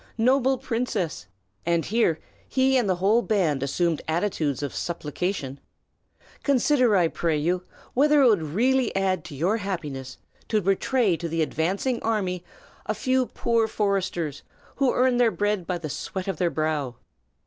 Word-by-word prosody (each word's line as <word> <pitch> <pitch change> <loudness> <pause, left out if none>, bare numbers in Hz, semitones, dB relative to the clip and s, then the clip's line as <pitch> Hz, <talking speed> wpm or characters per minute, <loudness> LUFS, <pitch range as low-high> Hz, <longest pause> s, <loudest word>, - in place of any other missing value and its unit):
Noble 260 +3 +3
princess!" 230 - -2 0.4
and 170 -1 +1
here 210 -7 +1 0.3
he 265 0 +3
and 240 -6 +2
the 185 - +3
whole 200 +6 +3
band 180 - +1
assumed 160 +3 0
attitudes 160 -5 -1
of 140 - -3
supplication, 155 -3 -3 0.8
"consider, 255 -4 +3
I 175 -3 +4
pray 165 -1 -1
you, 175 +4 0 0.3
whether 295 +2 +4
it - - +7
would 210 -7 +4
really 235 - +1
add 190 -3 +1
to 145 - -8
your 180 +10 +1
happiness 150 - -5 0.3
to 215 - +2
betray 195 +2 +2
to 170 0 -4
the 165 0 +1
advancing 195 - -1
army 190 -6 -1 0.4
a 215 - 0
few 255 +3 +1
poor 230 -1 +1
foresters, 190 -8 -1 0.4
who 270 -2 +3
earn 250 0 +2
their 245 -2 +4
bread 205 -4 -1
by 180 - -1
the 165 -2 -6
sweat 185 +6 -5
of 195 - -2
their 175 -2 +1
brow. 155 -6 -1
195 Hz, 155 wpm, -25 LUFS, 165-235 Hz, 0.8 s, it